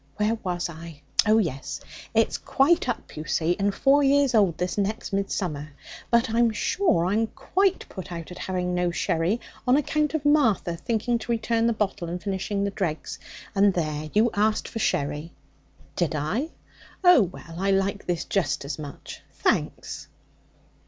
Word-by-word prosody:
Where 210 Hz, +2 st, +2 dB
was 180 Hz, -2 st, -2 dB
I? 165 Hz, -2 st, -10 dB, 0.3 s
Oh 215 Hz, +1 st, +5 dB
yes, 160 Hz, -11 st, -2 dB, 0.4 s
It's -, -, +2 dB
quite 280 Hz, 0 st, +2 dB
up, 240 Hz, -, -4 dB
you 155 Hz, -, -6 dB
see, 160 Hz, +5 st, +1 dB
and 200 Hz, +1 st, +2 dB
four 275 Hz, +7 st, +4 dB
years 280 Hz, -1 st, +4 dB
old 195 Hz, -7 st, +3 dB
this 180 Hz, 0 st, -2 dB
next 205 Hz, +1 st, -2 dB
midsummer. 165 Hz, -7 st, -2 dB, 0.4 s
But 235 Hz, +2 st, +4 dB
I'm 235 Hz, +1 st, +4 dB
sure 215 Hz, -, +1 dB
I'm 215 Hz, +5 st, +1 dB
quite 385 Hz, -, 0 dB
put 190 Hz, -1 st, -8 dB
out 170 Hz, 0 st, -6 dB
at 180 Hz, -, -9 dB
having 180 Hz, -1 st, -2 dB
no 180 Hz, 0 st, +1 dB
sherry, 170 Hz, +4 st, 0 dB, 0.3 s
on 250 Hz, +2 st, +5 dB
account 300 Hz, +1 st, 0 dB
of 300 Hz, -2 st, -2 dB
Martha 235 Hz, -, +3 dB
thinking 235 Hz, +4 st, -1 dB
to 235 Hz, -, -4 dB
return 230 Hz, 0 st, +1 dB
the -, -, +3 dB
bottle 200 Hz, -5 st, -2 dB
and 175 Hz, +1 st, -3 dB
finishing 200 Hz, +1 st, -2 dB
the 200 Hz, -, -1 dB
dregs. 160 Hz, -6 st, -3 dB, 0.3 s
And 200 Hz, -2 st, +4 dB
there, 155 Hz, -2 st, -2 dB
you 220 Hz, +2 st, +3 dB
asked 215 Hz, +1 st, +1 dB
for 225 Hz, -, -5 dB
sherry!' 150 Hz, -2 st, -1 dB, 0.6 s
'Did 170 Hz, -3 st, 0 dB
I? 210 Hz, -, -1 dB, 0.5 s
Oh, 360 Hz, -7 st, +8 dB
well, 170 Hz, -3 st, -5 dB
I 195 Hz, +1 st, +1 dB
like 195 Hz, +1 st, 0 dB
this 175 Hz, -2 st, -1 dB
just 175 Hz, -7 st, 0 dB
as 140 Hz, +2 st, -4 dB
much, 145 Hz, -2 st, -8 dB
thanks.' -, -, -1 dB
195 Hz, 165 wpm, -25 LUFS, 170-230 Hz, 0.6 s, Oh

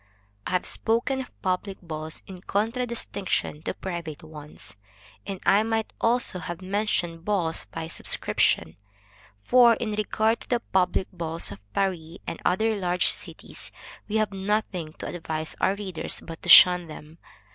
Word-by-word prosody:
I -, -, -3 dB
have 180 Hz, -, +1 dB
spoken 235 Hz, +4 st, 0 dB
of 255 Hz, -, -12 dB
public 190 Hz, +1 st, -1 dB
balls, 155 Hz, -2 st, -7 dB
in 185 Hz, -2 st, -10 dB
contradistinction 220 Hz, -7 st, -1 dB
to -, -, -3 dB
private 170 Hz, -5 st, -5 dB
ones, 150 Hz, -10 st, -9 dB, 0.5 s
and 195 Hz, -2 st, -4 dB
I 200 Hz, +2 st, +6 dB
might 225 Hz, 0 st, -1 dB
also 235 Hz, -5 st, +1 dB
have 175 Hz, 0 st, -5 dB
mentioned 185 Hz, -4 st, -1 dB
balls 180 Hz, -5 st, 0 dB
by 165 Hz, -1 st, -6 dB
subscription, 80 Hz, -, +1 dB, 0.7 s
for, 240 Hz, -, +6 dB
in 220 Hz, -1 st, -3 dB
regard 215 Hz, +2 st, +1 dB
to -, -, -13 dB
the 245 Hz, -, +2 dB
public 190 Hz, -3 st, +1 dB
balls 165 Hz, -4 st, -3 dB
of 100 Hz, -, -8 dB
Paris 175 Hz, -3 st, -1 dB
and -, -, -5 dB
other 220 Hz, +4 st, +2 dB
large 180 Hz, -2 st, +2 dB
cities, -, -, -6 dB, 0.4 s
we 215 Hz, -, -3 dB
have 215 Hz, -2 st, +1 dB
nothing 195 Hz, -5 st, -2 dB
to -, -, -8 dB
advise 160 Hz, -2 st, -4 dB
our 195 Hz, -, +3 dB
readers 190 Hz, -6 st, -2 dB
but 165 Hz, -1 st, -9 dB
to -, -, -6 dB
shun 180 Hz, -1 st, +9 dB
them. 155 Hz, +1 st, -11 dB
185 Hz, 150 wpm, -26 LUFS, 165-215 Hz, 0.7 s, shun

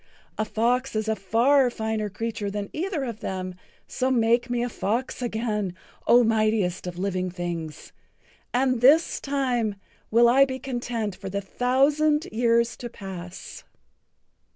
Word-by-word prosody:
A 215 Hz, -, +1 dB
fox 245 Hz, +4 st, 0 dB
is 215 Hz, 0 st, -1 dB
a 220 Hz, -, +1 dB
far 245 Hz, +7 st, +3 dB
finer 220 Hz, -2 st, -2 dB
creature 220 Hz, 0 st, -3 dB
than 200 Hz, 0 st, -5 dB
either 345 Hz, -3 st, -2 dB
of 235 Hz, -4 st, -5 dB
them, 185 Hz, -1 st, -4 dB, 0.3 s
so 255 Hz, -, -1 dB
make 235 Hz, 0 st, +2 dB
me 240 Hz, -1 st, 0 dB
a -, -, 0 dB
fox 235 Hz, +4 st, -2 dB
again, 215 Hz, -5 st, -2 dB, 0.3 s
O 245 Hz, +1 st, +7 dB
mightiest 215 Hz, -5 st, +1 dB
of 175 Hz, -1 st, -6 dB
living 185 Hz, -1 st, -1 dB
things, 170 Hz, -4 st, -5 dB, 0.6 s
and 255 Hz, -1 st, +1 dB
this 300 Hz, +6 st, +5 dB
time 250 Hz, -7 st, 0 dB, 0.3 s
will 235 Hz, +2 st, +5 dB
I 260 Hz, +3 st, +6 dB
be 260 Hz, -1 st, -4 dB
content 240 Hz, -5 st, -3 dB
for 195 Hz, 0 st, -7 dB
the 200 Hz, +1 st, -2 dB
thousand 280 Hz, +8 st, +2 dB
years 235 Hz, +1 st, +2 dB
to 240 Hz, -, -6 dB
pass." 185 Hz, -4 st, -9 dB
230 Hz, 145 wpm, -25 LUFS, 200-250 Hz, 0.6 s, O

